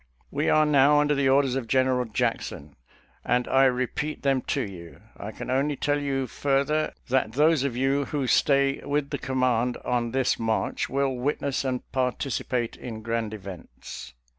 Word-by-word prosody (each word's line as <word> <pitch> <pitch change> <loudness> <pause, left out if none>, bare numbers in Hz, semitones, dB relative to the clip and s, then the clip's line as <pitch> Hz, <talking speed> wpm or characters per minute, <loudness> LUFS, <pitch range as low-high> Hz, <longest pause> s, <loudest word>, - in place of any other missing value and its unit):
We - - 0
are 155 0 +4
now 145 0 +5
under 150 0 +2
the 140 -2 +2
orders 135 -1 +3
of 130 -4 -3
General 130 0 +2
Jackson, 75 -9 -3 0.5
and 125 0 +1
I 135 0 +4
repeat 130 +4 -1
them 135 -2 +2
to 140 - 0
you. 85 -4 -9 0.2
I - - -7
can - - -6
only 140 +3 +1
tell 145 +2 0
you 135 -2 -1
further, 140 +4 0 0.2
that 130 -4 +1
those 150 0 +3
of 130 -4 -2
you 135 +2 +1
who 145 -2 -2
stay 140 +3 +2
with 145 0 -1
the 145 - -2
command 125 -2 0
on 120 -1 0
this 130 +1 0
march 110 -1 -1
will 135 0 0
witness 140 +2 -1
and 130 -2 -2
participate 125 -2 -1
in 110 -3 -8
grand 115 -1 -2
events." 95 - -9
130 Hz, 165 wpm, -26 LUFS, 120-140 Hz, 0.5 s, now